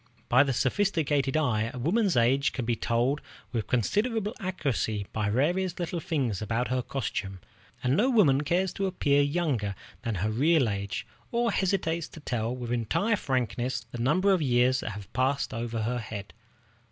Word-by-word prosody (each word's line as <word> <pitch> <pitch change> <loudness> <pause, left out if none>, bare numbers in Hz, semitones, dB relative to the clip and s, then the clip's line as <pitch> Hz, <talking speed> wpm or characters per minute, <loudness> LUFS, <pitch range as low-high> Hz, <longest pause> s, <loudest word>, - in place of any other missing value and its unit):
By 125 +3 +6
the 140 -1 +2
sophisticated 145 - +1
eye, 115 -7 +1
a - - -8
woman's 180 - +1
age 130 +4 +3
can 125 - -3
be 120 0 +1
told 120 +6 0 0.3
with 115 -4 -2
considerable 210 - 0
accuracy 135 - -1
by 105 -1 0
the 105 - 0
various 175 +7 +1
little 175 0 -2
things 140 - -1
about 115 +2 -1
her 130 0 +1
costume, 100 -7 -4 0.4
and 125 +2 +2
no 235 - +3
woman 160 - +4
cares 180 +4 0
to 195 - -1
appear 145 -6 +2
younger 140 - 0 0.3
than 115 -3 -2
her 100 +4 -1
real 145 +3 +3
age, 100 -1 -3 0.3
or 235 0 +1
hesitates 170 -4 0
to - - -12
tell 120 -4 -2
with 120 -2 -5
entire 120 - +1
frankness 125 - -1
the 120 - -6
number 185 +11 +3
of 185 - +1
years 130 -1 +3
that - - -4
have 100 -2 -10
passed 135 +2 0
over 115 -1 -3
her 120 +2 -1
head. 105 -3 -7
130 Hz, 175 wpm, -28 LUFS, 115-170 Hz, 0.4 s, By